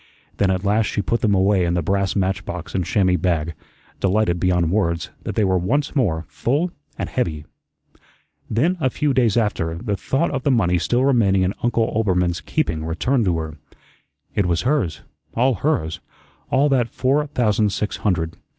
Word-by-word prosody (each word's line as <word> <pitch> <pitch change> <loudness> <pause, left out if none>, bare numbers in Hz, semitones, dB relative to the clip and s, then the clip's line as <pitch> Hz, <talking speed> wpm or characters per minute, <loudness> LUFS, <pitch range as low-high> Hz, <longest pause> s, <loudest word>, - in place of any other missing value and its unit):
Then 100 - +2
at 95 0 0
last 105 +2 +2
she 100 - -2
put 115 +7 0
them 105 -3 +3
away 95 0 +3
in 85 0 0
the 85 - 0
brass 100 +2 0
match 95 -1 0
box 90 -2 -6
and 95 - 0
chamois 90 0 +2
bag, 85 -2 0 0.5
delighted 95 -2 +1
beyond 90 -2 +1
words 85 -5 0
that - - -5
they 110 - +2
were 95 -2 +2
once 140 - -1
more 85 - +1
full 150 - -1 0.3
and - - -3
heavy. 80 -12 -2 1.0
Then, 160 - +1
a 130 - +2
few 145 +2 0
days 120 -5 +2
after, 85 -7 0
the 105 +1 -2
thought 135 - -1
of 135 -2 -2
the 140 - 0
money 90 -9 +2
still 120 +10 +1
remaining 100 -8 +3
in 95 +2 0
Uncle 120 -1 +2
Oelbermann's 90 -5 +1
keeping 80 -1 -1
returned 110 +10 0
to 90 -3 +1
her. 80 -2 -6 0.7
It 100 - +1
was 85 -1 0
hers, 120 - 0 0.3
all 130 +3 +3
hers 90 - -1 0.5
all 140 +2 +3
that 125 -4 +2
four 145 +3 +1
thousand 110 -6 +1
six 105 +1 -2
hundred. 85 -5 -1
100 Hz, 180 wpm, -21 LUFS, 85-120 Hz, 1.0 s, them